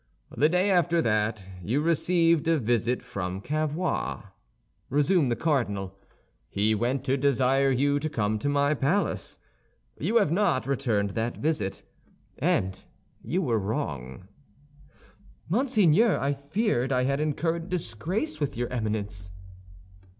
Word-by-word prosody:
"The 150 - +3
day 180 +4 +2
after 175 -2 +3
that, 105 -2 0 0.2
you 115 +11 0
received 165 0 +2
a 165 -1 +4
visit 120 0 0
from 95 -6 -4
Cavois," 155 - -2 0.7
resumed 150 +1 +2
the 120 - +1
cardinal. 100 - -1 0.5
"He 105 +2 +1
went 120 +5 0
to 135 0 +1
desire 135 0 +2
you 140 +2 +2
to 155 +2 -2
come 110 -5 -1
to 125 - -2
the 145 +1 +2
palace. 175 +10 0 0.6
You 230 - -1
have 205 -9 +4
not 180 -7 +1
returned 115 -7 0
that 115 +3 -2
visit, 125 -11 -2 0.6
and 95 0 0 0.4
you 185 +2 -1
were 115 -6 +1
wrong." 95 - -4 1.2
"Monseigneur, 215 - +3
I 140 +1 0
feared 140 - -1
I 125 -1 +2
had 140 +2 0
incurred 165 +3 -1
disgrace 180 - -3
with 145 -5 -2
your 120 0 -2
Eminence." 105 -5 -3
140 Hz, 130 wpm, -27 LUFS, 110-165 Hz, 1.2 s, a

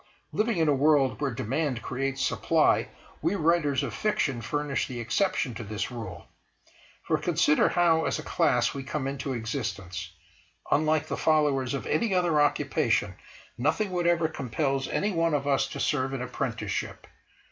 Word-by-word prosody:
Living 220 -1 0
in 160 -1 +2
a 145 - +4
world 140 -1 +3
where 140 - +1
demand 130 +2 -2
creates 135 +1 -2
supply, - - +2 0.3
we 200 - +1
writers 155 -6 +2
of - - -4
fiction 145 - 0
furnish 145 +4 -1
the 125 -3 -6
exception 125 - 0
to 115 +2 -6
this 105 +2 -4
rule. 110 -8 -7 0.8
For, - - 0
consider 150 - +3
how, 165 -2 +3
as - - 0
a 155 - -6
class, 125 -9 +2
we 140 - -5
come 135 0 -3
into 135 0 -3
existence. 95 - -4 0.6
Unlike 155 0 +2
the - - -4
followers 145 -5 +2
of 140 - -5
any 225 -5 +1
other 170 -4 +3
occupation, 145 - +1 0.5
nothing 160 - +1
whatever 175 -2 +2
compels 135 -1 -2
any 210 - 0
one 165 -3 +1
of 140 -1 -1
us 135 -1 +2
to - - -7
serve 135 -2 0
an 135 - -3
apprenticeship. 125 - -4
140 Hz, 160 wpm, -27 LUFS, 130-160 Hz, 0.8 s, a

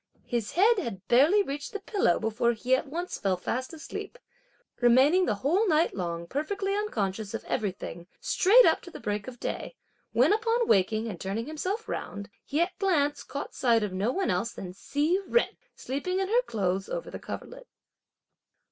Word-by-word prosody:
His 235 -4 -2
head 420 +5 +4
had 195 - -5
barely 310 +12 +5
reached 290 +8 -5
the 415 - -3
pillow 390 - +1
before 225 +2 +1
he 250 +3 +2
at 260 - -3
once 345 +6 -4
fell 190 -2 +1
fast 255 +8 -3
asleep, 325 +9 -7 0.6
remaining 270 +10 +5
the - - +1
whole 335 - +1
night 320 -1 +3
long 170 -2 -3
perfectly 390 - -2
unconscious 215 - -2
of - - -5
everything 180 -4 -3
straight 455 +7 +5
up - - +4
to - - -11
the - - -10
break 205 -1 -3
of 245 -2 -8
day, - - -4 0.4
when - - +4
upon 460 +2 +1
waking 215 +3 +2
and 190 -6 -6
turning 200 +4 -2
himself 370 - -3
round, 200 0 -5
he, 290 - -2
at 345 - +2
a - - -43
glance, 295 -7 +1
caught 280 +2 -6
sight 230 -4 +3
of 205 -3 -3
no 200 +6 0
one 380 - 0
else 200 +6 -1
than 180 -1 -7
Hsi 300 - 0
Jen, 480 - +4 0.3
sleeping 290 +8 -3
in 385 0 -1
her 475 +3 +4
clothes 190 -2 -1
over - - -4
the - - -6
coverlet. - - -8
270 Hz, 185 wpm, -28 LUFS, -, 0.6 s, barely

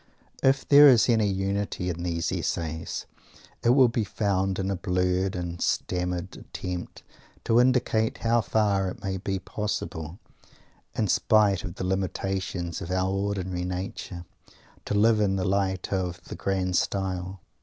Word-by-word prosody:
If 135 0 +2
there 145 0 +9
is 120 -4 +5
any 110 -3 +3
unity 95 -1 -2
in 85 0 -6
these 85 -2 -1
essays, 80 -1 -3 0.6
it - - +2
will 130 +1 +6
be 115 -1 0
found 95 -2 0
in 95 0 -1
a - - 0
blurred 90 +1 0
and 85 -1 -5
stammered 90 0 -1
attempt 90 -1 -6 0.4
to 115 +1 +3
indicate 125 -3 +2
how 115 +1 +2
far 100 -4 +1
it - - -9
may 95 -1 -2
be 95 +1 -2
possible, 95 -4 -4 0.8
in 110 - +1
spite 105 -1 +3
of 90 -4 -6
the 95 - -4
limitations 95 -2 -2
of 85 - -6
our 95 +1 0
ordinary 95 -2 -2
nature, 90 -1 -5 0.6
to - - -2
live 110 +1 +4
in 100 -2 +2
the 95 - -1
light 95 -1 0
of 90 -2 -2
the - - -8
"grand 95 -2 0
style." 95 -1 -2
95 Hz, 150 wpm, -26 LUFS, 90-105 Hz, 0.8 s, there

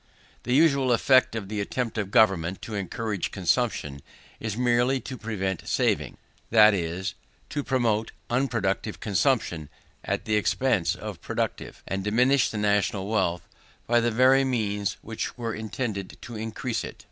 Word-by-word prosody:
The 125 +2 +1
usual 140 -4 +4
effect 130 0 +4
of 105 -3 -4
the 105 0 -3
attempts 115 +2 -2
of 100 -2 -2
government 95 -5 +3
to 110 - -6
encourage 100 0 -3
consumption, 90 - -1 0.4
is 110 -1 -4
merely 125 +2 +2
to 130 - -6
prevent 95 -6 -3
saving; - - 0 0.3
that 110 -1 +7
is, 95 +2 -2 0.4
to 145 - -2
promote 115 -5 0 0.2
unproductive 115 -7 -1
consumption 100 - 0 0.3
at - - -2
the 110 -1 +2
expense 110 -3 +1
of - - -7
reproductive, - - -4
and 95 +1 -2
diminish 125 +5 +3
the 110 - -5
national 100 -1 +1
wealth 90 -5 0 0.4
by 120 0 +3
the 120 0 +1
very 130 +4 +5
means 105 -6 -1
which 110 +2 -5
were 115 -2 -3
intended 105 -2 -4
to 120 - -8
increase 110 +2 -3
it. - - -8
110 Hz, 145 wpm, -26 LUFS, 100-125 Hz, 0.4 s, that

